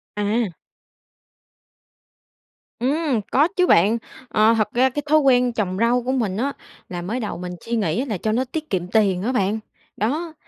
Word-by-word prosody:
À. 210 -2 -1 2.2
Ừm, 275 -1 0
có 295 +5 +4
chứ 360 -1 +3
bạn. 205 +7 +4 0.3
Ờ, 220 0 +4
thật 215 - 0
ra 255 +2 +4
cái 290 +3 -3
thói 310 - +6
quen 250 -3 +3
trồng 190 -4 -2
rau 240 +1 +2
của 255 - -1
mình 220 -8 -1
á, 275 +5 -1 0.4
là 175 -1 -5
mới 210 +8 -3
đầu 215 -4 -4
mình 180 0 -6
suy 235 +1 -1
nghĩ 175 -5 0
á 265 - -1
là 220 -7 -3
cho 215 +5 -1
nó 245 +4 +1
tiết 310 -1 -4
kiệm 180 -2 -1
tiền 195 -3 +2
á 230 +6 -1
bạn, 215 -2 0 0.4
đó, 310 +10 -1
230 Hz, 185 wpm, -22 LUFS, 205-260 Hz, 2.2 s, thói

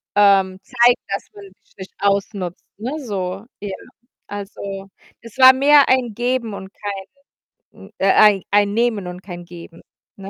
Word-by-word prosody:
ähm, 195 -2 +4
zeigen, 240 0 +3
dass 195 - -4
man 200 -1 -11 0.2
sich - - -31
nicht 190 0 -10
ausnutzt, 200 -2 -2
ne, 255 +8 -4
so. 195 -4 -5 0.2
Ja, 200 -2 -5 0.5
also, 195 -1 -7 0.3
es 230 +2 -14
war 260 0 +9
mehr 285 +1 +5
ein 250 -4 +2
Geben 240 -1 -2
und 190 0 -9
kein 200 -2 -6 0.7
n - - -16
äh, 195 - +1
ein 210 -3 +5
ein 205 0 +3
Nehmen 225 -5 0
und 180 +1 -8
kein 175 -2 -9
Geben, 170 -1 -13 0.4
ne? 195 0 -9
200 Hz, 155 wpm, -20 LUFS, 190-235 Hz, 0.7 s, war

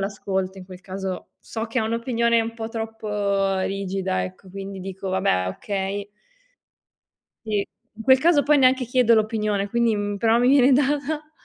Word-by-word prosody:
l'ascolto, 195 -1 -3
in 185 - -9
quel 185 -1 -12
caso 190 -1 -5
so 225 0 -5
che 230 +3 -2
ha 220 - +1
un'opinione 235 0 +1
un 225 +1 -3
po' 225 -1 -6
troppo 210 -4 -1
rigida, 190 -1 -2
ecco, 185 +1 -10
quindi 195 0 -7
dico: 190 0 -6
"Vabbè 185 - +1
okay". 200 - -4 1.4
Sì. 205 -2 0 0.3
In - - -6
quel 260 +1 +6
caso 315 -1 +4
poi 295 0 +4
neanche 260 0 +4
chiedo 240 -1 +3
l'opinione, 215 -2 0
quindi 235 0 +2
mhmm, 205 0 -2
però 225 +3 +3
mi 245 - +4
viene 270 -1 +6
data. 290 +3 0
210 Hz, 165 wpm, -23 LUFS, 195-235 Hz, 1.4 s, quel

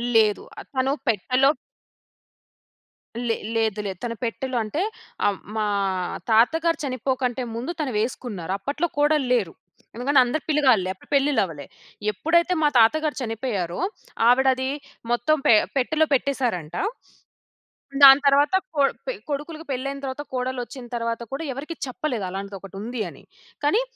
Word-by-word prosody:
లేదు. 215 -2 +4 0.2
ఆహ్, - - -9
తను 260 +1 +2 0.2
పెట్టలో 255 +5 +3 1.8
లే 225 - +2 0.2
లేదులే. 215 -3 0
తన 235 -1 -2
పెట్టెలో 250 +2 -2
అంటే 290 - -2 0.5
అహ్, 200 -2 0 0.2
మా 215 -1 +1 0.7
తాతగారు 320 +9 +4
చనిపోకంటే 255 0 -1
ముందు 250 +9 -3
తను 280 -4 -1
వేసుకున్నారు. 215 -6 -3
అప్పట్లో 290 - -1
కోడళ్ళేరు. 260 - +2 0.4
ఎందుకంటే 265 +3 +3
అందరు 285 +5 -2
పిలగాళ్ళే. 260 -11 +3
అప్పుడు 190 - -22
పెళ్లిళ్ళవ్వలే. 195 - +1 0.5
ఎప్పుడైతే 340 - +2
మా - - +6
తాతగారు 305 +7 +3
చనిపోయారో, 225 -7 -3 0.5
ఆవిడది 260 +1 +4 0.4
మొత్తం 240 +6 +2
పె - - +8 0.2
పెట్టెలో 315 +5 +2
పెట్టేశారంట. 245 - 0 1.3
దాని 270 +1 +11
తరువాత 285 +4 +4 0.2
కొ 285 - +4 0.2
పె - - -1 0.2
కొడుకులుకి 305 +3 -4
పెళ్లయిన 275 +2 -3
తరువాత 265 +2 -4
కోడల్లొచ్చిన 255 0 -4
తరువాత 230 0 -2
కూడా 290 +4 -3
ఎవరికీ 300 +5 -6
చెప్పలేదు 250 -5 -3
అలాంటిదొకటుంది 195 +4 -6
అని. - - -16 0.4
కానీ 415 +12 +3
255 Hz, 120 wpm, -24 LUFS, 225-285 Hz, 1.8 s, దాని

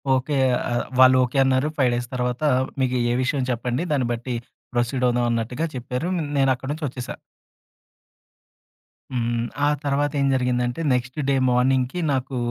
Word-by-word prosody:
Okay. 135 +2 -1 0.3
ఆహ్, 120 - 0
వాళ్ళు 130 0 +7
okay 125 +3 -2
అన్నారు. 130 +2 +2
5 130 -3 +3
డేస్ 120 0 -3
తర్వాత 125 +3 -2 0.4
మీకు 125 -1 +1
ఏ - - +2
విషయం 130 0 0
చెప్పండి. 125 +5 -2
దాన్ని 130 -5 +1
బట్టి 120 +1 -4 0.4
ప్రొసీడ్ 125 +1 0
అవుదామన్నట్టుగా 120 +3 0
చెప్పారు 125 +6 -3 0.3
నేనక్కడి 135 0 +1
నుంచొచ్చేసా. 135 -5 -5 2.0
హ్మ్. 120 -1 -1 0.2
ఆ - - +4 0.2
తర్వాత 145 +1 0
ఏం 140 - +2
జరిగిందంటే 125 +2 0
నెక్స్ట్ 125 +2 -2
డే 135 - +3 0.2
మార్నింగ్‌కి 130 +5 +1
నాకు 130 0 -2
125 Hz, 135 wpm, -23 LUFS, 120-135 Hz, 2.0 s, వాళ్ళు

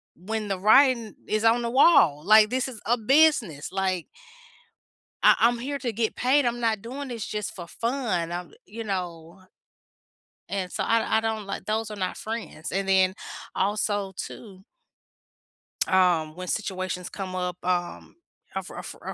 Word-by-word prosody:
when 215 +5 -4
the 195 -2 -2
writing 230 +1 +4
is 215 0 0
on 230 +1 +4
the 235 - -2
wall. 235 - +5
Like, 215 +1 +7
this 255 +1 0
is 240 -5 -9
a 240 +3 +2
business. 235 - +3
Like 190 -3 -1 1.2
I - - +7
I'm 235 +1 +4
here 280 +4 -3
to 245 -2 -2
get 220 0 -1
paid. 270 +3 +3
I'm 240 0 0
not 225 -3 0
doing 265 +5 -6
this 230 -3 -5
just 210 -1 -4
for 175 -3 -8
fun. 230 -8 -2
I 175 +1 -4 0.2
you 230 - -7
know? 180 -3 -5 1.1
And 190 -2 -3
so - - -2
I 225 -1 +2
I - - +1
don't 220 -2 -2
like, 195 - -6
those 215 0 -2
are - - -5
not 185 -2 -3
friends, 220 -7 -6
and 195 0 -1
then 190 -1 +4 0.4
also 205 0 0
too 190 -4 -8 1.2
um, 175 -4 +2
when 180 +1 -7
situations 185 -3 -3
come 190 -2 -6
up, 180 -1 -3
um, 175 -1 -2 0.4
a - - -1
fri - - -11
a - - -7
fri - - -11
a - - -5
210 Hz, 170 wpm, -26 LUFS, 185-230 Hz, 1.2 s, Like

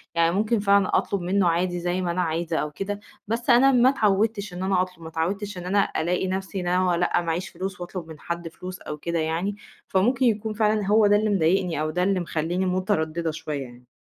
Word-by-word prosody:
يعني 170 +1 +3
ممكن 215 +2 +1
فاهمة، 200 -1 +3
أطلب 200 -3 +1
منه 185 +1 +2
عادي 175 +1 0
زي 175 +1 -1
ما 175 -2 -1
أنا 180 +1 0
عايزة 165 0 -1
أو 150 0 -2
كده، 200 +5 -4 0.3
بس 230 +4 -2
أنا 260 +3 +6
ما 250 0 +5
اتعودتش 210 -4 +1
إن 180 +1 -5
أنا 190 -1 +2
أطلب، 180 -2 -5
ما 160 - -7
اتعودتش 190 +5 -3
إن 180 - -7
أنا 200 +2 +1
ألاقي 180 +3 0
نفْسِي 190 +1 -3
إن 175 - -4
أنا 180 -1 +2
لأ 175 0 +1
ما 165 -1 -2
عييش 180 +3 -3
فلوس 190 -1 -6
وأطلب 175 -1 -6
من 155 -2 -11
حد 170 0 -4
فلوس، 180 +2 -8
أو 150 - -6
كده 170 +2 -2
يعني. 165 +6 -1 0.3
فممكن 245 +8 +2
يكون 220 -1 +1
فعلًا 215 -1 +1
هو 210 0 +5
ده 205 - +5
اللي 215 +1 +2
مضايقني 180 -3 +1
أو 155 - -1
ده 180 +3 0
اللي 195 0 +2
مخلّيني 175 +2 -1
مترددة 170 -3 0
شوية 155 -3 -4
يعني. 125 -1 -14
185 Hz, 225 wpm, -25 LUFS, 170-205 Hz, 0.3 s, أنا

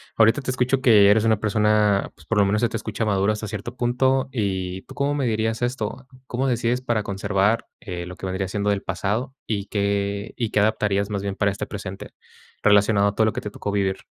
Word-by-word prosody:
Ahorita 115 +4 +4
te 130 - -5
escucho 130 +1 +1
que 105 -5 +6
eres 110 +1 +3
una 110 -2 +3
persona, 105 -1 +2
pues, 80 - -19
por 115 +3 0
lo 100 - +5
menos 105 +3 +1
se 120 - +2
te 115 - -3
escucha 110 0 -3
madura 100 0 +2
hasta 110 0 -5
cierto 120 +5 -6
punto 130 +2 +1
y, 95 -5 -2
¿tú - - -13
cómo 140 +1 0
medirías 115 -4 -1
esto? 130 +1 -3 0.2
¿Cómo 130 +3 -1
decides 120 0 0
para 120 -4 0
conservar 100 +3 0 0.2
lo 90 -1 -6
que 95 - -8
vendría 95 0 -2
siendo 105 +1 -1
del 100 -1 -1
pasado? 120 +7 -2
¿Y 100 -3 -2
qué 100 0 -1
y 115 -4 -1
qué 105 - +2
adaptarías 105 -1 +1
más 100 -1 -2
bien 100 -1 -3
para 100 0 +1
este 100 - -5
presente, 95 -2 -7 0.5
relacionado 100 0 +4
a 100 - -7
todo 110 - +3
lo 110 - +1
que - - -4
te 105 - -6
tocó 100 - -4
vivir? 95 -1 -1
105 Hz, 215 wpm, -23 LUFS, 100-115 Hz, 0.5 s, que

